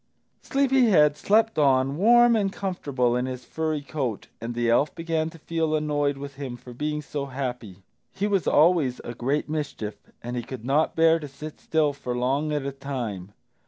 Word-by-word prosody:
Sleepy 270 -2 +2
head 150 -8 +5
slept 220 +5 +2
on, 135 -1 +3
warm 240 +6 +5
and 200 -3 +1
comfortable 140 -12 -1
in 125 +1 0
his 125 -1 -6
furry 155 -2 -2
coat, 135 -7 -4
and 115 +1 -4
the 120 0 0
elf 120 +6 +2
began 165 -1 -1
to 165 - -13
feel 160 0 -1
annoyed 145 -2 0
with 140 0 -8
him 130 -4 -5
for 125 +1 -12
being 150 +4 -3
so 140 0 -4
happy. 125 -8 -5 0.3
He 200 - -2
was 195 -5 +1
always 150 -5 +3
a 120 - -6
great 135 +5 -1
mischief, 145 -9 -5
and 120 +1 -4
he 120 - -1
could 120 -1 -8
not 145 +4 +1
bear 165 0 +4
to 150 - -7
sit 145 +3 -9
still 155 -2 +1
for 125 -3 -4
long 135 +5 0
at 145 -2 -1
a 140 - -2
time. 120 -9 -5
145 Hz, 190 wpm, -25 LUFS, 125-160 Hz, 0.3 s, head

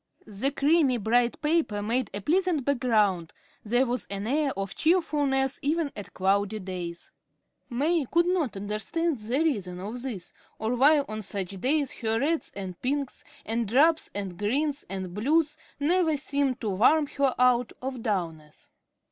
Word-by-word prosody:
The 215 +6 0
creamy, 285 -2 +3
bright 235 +2 +1
paper 300 -10 +1
made 240 +4 0
a 200 - -5
pleasant 335 - +1
background; 215 - +1 0.3
there 245 +4 +2
was 250 0 -3
an 200 +1 -4
air 285 +4 +1
of 195 -1 -3
cheerfulness 290 -6 +1
even 305 +1 0
on 205 - -5
cloudy 200 +3 0
days. 180 -3 -6 0.6
May 290 +4 +1
could 340 +1 +4
not 345 - 0
understand 230 - -2
the 225 +5 -2
reason 190 - -1
of 215 +6 -6
this, 220 -9 -6 0.2
or 220 +2 -1
why 290 +4 +5
on 215 -6 -6
such 195 -1 -5
days 285 0 +1
her 225 -1 +1
reds 315 +5 0
and 185 -3 -7
pinks 275 +1 -2 0.2
and 225 0 -1
drabs 305 +8 +3
and 195 -3 -5
greens 280 +7 -1
and 190 -2 -5
blues 300 - +1 0.2
never 320 +1 +2
seemed 275 -2 -1
to 220 - -1
warm 250 +11 +4
her 280 -2 0
out 250 -1 +3
of 260 -2 -5
dulness. 165 -8 -4
250 Hz, 155 wpm, -27 LUFS, 205-290 Hz, 0.6 s, why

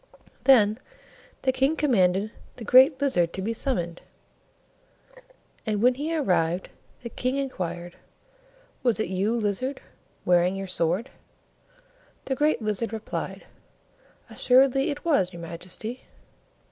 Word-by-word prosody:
Then 220 -4 +5 0.6
the 260 - +3
King 270 +4 +1
commanded 205 - +2 0.2
the 240 - -9
Great 260 +5 +6
Lizard 180 -12 +1
to 190 - -4
be 225 +3 -1
summoned, 175 -10 -3 1.6
and 215 -2 -1
when 250 +4 +4
he 300 +6 -3
arrived, 180 - 0 0.3
the 235 - -5
King 255 +3 -2
inquired, 175 -10 -4 0.8
"Was 240 -4 +1
it 220 - -1
you, 195 +5 0
Lizard, 235 +5 -2 0.5
wearing 180 +1 +3
your 195 0 -4
sword?" 180 +4 -1 1.1
The 265 - -1
Great 295 -3 +1
Lizard 215 +1 -1
replied, 220 -1 -5 0.8
"Assuredly 270 +1 +3
it 290 +2 -5
was, 195 - +2
your 170 - -8
Majesty." 180 +8 -7
220 Hz, 120 wpm, -26 LUFS, 185-265 Hz, 1.6 s, Great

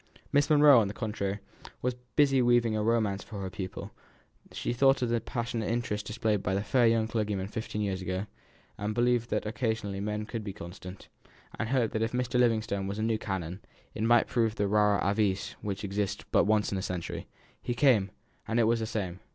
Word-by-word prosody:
Miss 145 +2 +3
Monro, 145 -4 +7
on 105 - +2
the 100 - -6
contrary, 100 -2 -2 0.5
was 125 0 +1 0.2
busy 135 -3 +4
weaving 120 -2 +3
a 105 - 0
romance 105 -3 +1
for 105 - -8
her 95 -1 -4
pupil; 95 -1 -6 0.6
she - - -2
thought 135 +1 +4
of 120 - 0
the 115 -1 +1
passionate 115 -2 -3
interest 115 -3 -2
displayed 105 -2 0
by 95 0 -1
the 100 - 0
fair 120 +2 +3
young 115 -1 +2
clergyman 105 -4 -1
fifteen 105 0 -4
years 95 -2 -2
ago, 95 +2 -2 0.5
and 105 +1 -2
believed 120 -1 +2
that - - -1
occasionally 110 -2 -2
men 105 +1 -2
could 115 0 -5
be 100 -2 -5
constant, 90 0 -10 0.5
and 115 - -1
hoped 125 -4 +1
that 110 - -1
if 115 +1 -1
Mr. 125 0 0
Livingstone 110 -5 +1
were 100 - -3
the 110 - -2
new 110 -1 +1
canon, 95 -2 -4 0.3
he - - -5
might 120 +1 +5
prove 115 -3 0
the 105 - 0
rara 105 -1 +3
avis 100 -2 +1
which 100 -1 -4
exists 100 0 -2
but - - +4
once 105 0 +2
in 95 - -1
a - - -3
century. 90 -3 -4 0.3
He 120 - -2
came, 120 -6 +4 0.4
and 115 - +1
it - - +5
was 115 +1 +2
the 110 - -2
same. 95 -5 -3
110 Hz, 205 wpm, -29 LUFS, 100-120 Hz, 0.6 s, Monro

